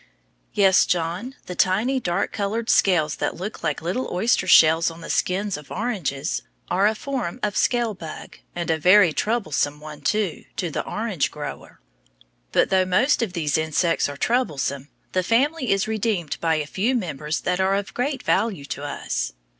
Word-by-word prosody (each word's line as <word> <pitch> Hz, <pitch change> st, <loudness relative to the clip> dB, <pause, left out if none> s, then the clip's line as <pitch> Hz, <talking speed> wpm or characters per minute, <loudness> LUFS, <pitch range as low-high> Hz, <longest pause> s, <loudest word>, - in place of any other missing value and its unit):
Yes, 195 Hz, -2 st, +5 dB
John, 180 Hz, +9 st, -2 dB
the 180 Hz, -, -6 dB
tiny, 210 Hz, +9 st, +2 dB
dark 180 Hz, -3 st, -1 dB
colored 220 Hz, +3 st, -1 dB
scales 160 Hz, -6 st, +3 dB
that -, -, -2 dB
look 195 Hz, +5 st, -6 dB
like -, -, -1 dB
little 185 Hz, +10 st, -2 dB
oyster 190 Hz, 0 st, +1 dB
shells 165 Hz, -1 st, +6 dB
on 165 Hz, 0 st, -11 dB
the -, -, -5 dB
skins 195 Hz, 0 st, 0 dB
of 150 Hz, -1 st, -12 dB
oranges 170 Hz, -, -2 dB, 0.3 s
are 195 Hz, +3 st, +4 dB
a 220 Hz, -, +1 dB
form 255 Hz, -4 st, -4 dB
of 210 Hz, -2 st, 0 dB
scale 240 Hz, -3 st, +1 dB
bug, 165 Hz, -5 st, -9 dB, 0.2 s
and 170 Hz, -1 st, -1 dB
a 160 Hz, -, 0 dB
very 180 Hz, 0 st, +6 dB
troublesome 155 Hz, -10 st, 0 dB
one, 150 Hz, -1 st, -10 dB
too, 205 Hz, +1 st, -1 dB
to 175 Hz, -4 st, -2 dB
the -, -, -2 dB
orange 210 Hz, -8 st, -1 dB
grower. 145 Hz, -, -8 dB, 0.7 s
But -, -, +2 dB
though 190 Hz, -1 st, +4 dB
most 215 Hz, +12 st, +2 dB
of 215 Hz, -6 st, -2 dB
these 155 Hz, -4 st, 0 dB
insects 160 Hz, +1 st, +1 dB
are 140 Hz, -, -7 dB
troublesome, 140 Hz, -, -1 dB, 0.2 s
the 185 Hz, -, +1 dB
family 255 Hz, -, +1 dB
is 195 Hz, +1 st, +1 dB
redeemed 215 Hz, -7 st, -1 dB
by 165 Hz, -1 st, +2 dB
a 155 Hz, -1 st, -1 dB
few 210 Hz, -, 0 dB
members 155 Hz, -, -2 dB
that 180 Hz, 0 st, -1 dB
are 190 Hz, +1 st, +2 dB
of 200 Hz, 0 st, -3 dB
great 265 Hz, +2 st, -2 dB
value 200 Hz, -11 st, 0 dB
to 145 Hz, -, -6 dB
us. -, -, -3 dB
185 Hz, 175 wpm, -23 LUFS, 160-220 Hz, 0.7 s, shells